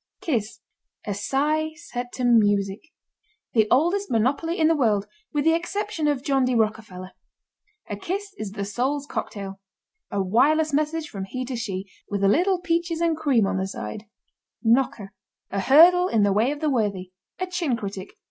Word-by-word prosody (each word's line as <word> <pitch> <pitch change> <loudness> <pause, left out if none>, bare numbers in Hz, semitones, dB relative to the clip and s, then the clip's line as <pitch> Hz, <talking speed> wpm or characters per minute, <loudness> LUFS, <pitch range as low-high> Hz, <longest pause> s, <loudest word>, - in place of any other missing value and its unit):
KISS. 240 - -2 0.4
A 205 - -2
sigh 300 +9 0
set 245 -7 -6
to 255 - -4
music. 205 -4 +3 0.7
The 220 -2 +4
oldest 350 +9 +2
monopoly 270 +9 0
in 315 - +4
the 325 - +3
world 215 -8 +2 0.3
with 295 -1 -1
the 325 - +5
exception 350 -1 -2
of 285 -3 0
John 275 -2 +2
D. 250 -1 +1
Rockerfeller. 215 -4 -2 0.8
A 205 - -5
kiss 395 - -4
is 205 -2 -5
the 200 -1 -3
soul's 265 +8 -1
cocktail. 195 -7 -5 0.5
A 200 - -2
wireless 285 +11 +3
message 305 +2 0
from 195 -8 -6
he 255 +6 -5
to 255 0 -4
she, 195 -5 -4 0.2
with 200 -1 -2
a - - +5
little 360 - +3
peaches 340 -2 -1
and 335 -1 +2
cream 275 -9 +2
on 195 - -1
the 190 0 -1
side. 190 - -6 0.6
KNOCKER. 225 -4 +1 0.4
A 195 - -1
hurdle 345 - +6
in 220 - +2
the 200 -1 +3
way 220 +5 +2
of 295 +1 -4
the 310 - +1
worthy. 200 -7 -1 0.3
A 370 - -2
chin 350 -9 -1
critic. 200 -3 -6
255 Hz, 175 wpm, -24 LUFS, 205-315 Hz, 0.8 s, hurdle